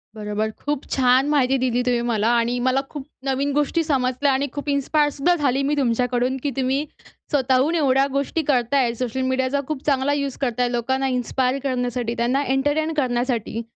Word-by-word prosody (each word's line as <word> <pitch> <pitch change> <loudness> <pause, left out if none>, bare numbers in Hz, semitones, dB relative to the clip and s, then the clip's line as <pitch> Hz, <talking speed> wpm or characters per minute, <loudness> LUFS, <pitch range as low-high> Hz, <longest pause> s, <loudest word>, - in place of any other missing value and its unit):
बरोबर. 210 0 -2
खूप 290 +5 -4
छान 260 +1 +3
माहिती 270 -3 +2
दिली 250 -1 +1
तुम्ही 245 -1 +1
मला 220 -2 +1
आणि 235 +1 0
मला 260 +1 +2
खूप 290 -3 -7 0.2
नवीन 275 +1 0
गोष्टी 295 +3 +1
समजल्या 270 -2 +1
आणि 275 +2 0
खूप 290 0 -5
इन्स्पायर 290 +1 +2
सुद्धा 320 +6 +1
झाली 275 -4 +1
मी 295 - +1
तुमच्याकडून 250 0 0
की 290 - 0
तुम्ही 265 +2 0 0.5
स्वतःहून 270 +3 +2
एवढ्या 275 -4 +3
गोष्टी 280 +4 -1
करताय. 245 -1 +2
सोशल 250 +1 -3
मीडियाचा 260 +2 0
खूप 300 -3 -4
चांगला 275 0 +1
यूज 280 -2 -2
करताय 245 -1 0
लोकांना 265 +3 0
इन्स्पायर 255 +1 0
करण्यासाठी, 245 -3 -2
त्यांना 250 +4 +1
एंटरटेन 290 +4 0
करण्यासाठी. 245 -4 -1
265 Hz, 165 wpm, -22 LUFS, 245-280 Hz, 0.5 s, छान